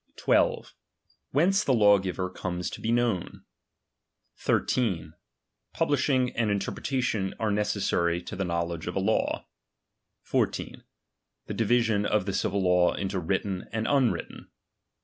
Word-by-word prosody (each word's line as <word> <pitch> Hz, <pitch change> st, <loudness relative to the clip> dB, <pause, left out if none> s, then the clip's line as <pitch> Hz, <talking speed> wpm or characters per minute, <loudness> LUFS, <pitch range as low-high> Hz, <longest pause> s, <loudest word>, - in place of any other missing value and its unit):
12. -, -, +1 dB, 0.6 s
Whence 190 Hz, +8 st, +3 dB
the 135 Hz, -, +2 dB
lawgiver 95 Hz, -4 st, +3 dB
comes 90 Hz, -1 st, -4 dB
to -, -, -8 dB
be 115 Hz, -, -1 dB
known. 120 Hz, -6 st, 0 dB, 1.0 s
23. 95 Hz, -11 st, 0 dB, 0.6 s
Publishing 135 Hz, -5 st, +1 dB
and 115 Hz, -2 st, +1 dB
interpretation 105 Hz, 0 st, -1 dB
are 110 Hz, -2 st, 0 dB
necessary 100 Hz, -5 st, 0 dB
to 85 Hz, -, -8 dB
the 95 Hz, -, -2 dB
know 85 Hz, -1 st, -1 dB
ledge 85 Hz, -1 st, -6 dB
of 90 Hz, -, -4 dB
a -, -, +1 dB
law. 110 Hz, +3 st, 0 dB, 0.8 s
14. -, -, -2 dB, 0.6 s
The -, -, -5 dB
division 115 Hz, -2 st, +2 dB
of 105 Hz, -3 st, +1 dB
the 100 Hz, -, -2 dB
civil 100 Hz, +1 st, 0 dB
law 90 Hz, -1 st, +3 dB
into 95 Hz, -1 st, -2 dB
written 95 Hz, +2 st, -2 dB
and 110 Hz, 0 st, -2 dB
unwritten. 135 Hz, -5 st, 0 dB
100 Hz, 130 wpm, -27 LUFS, 90-120 Hz, 1.0 s, Whence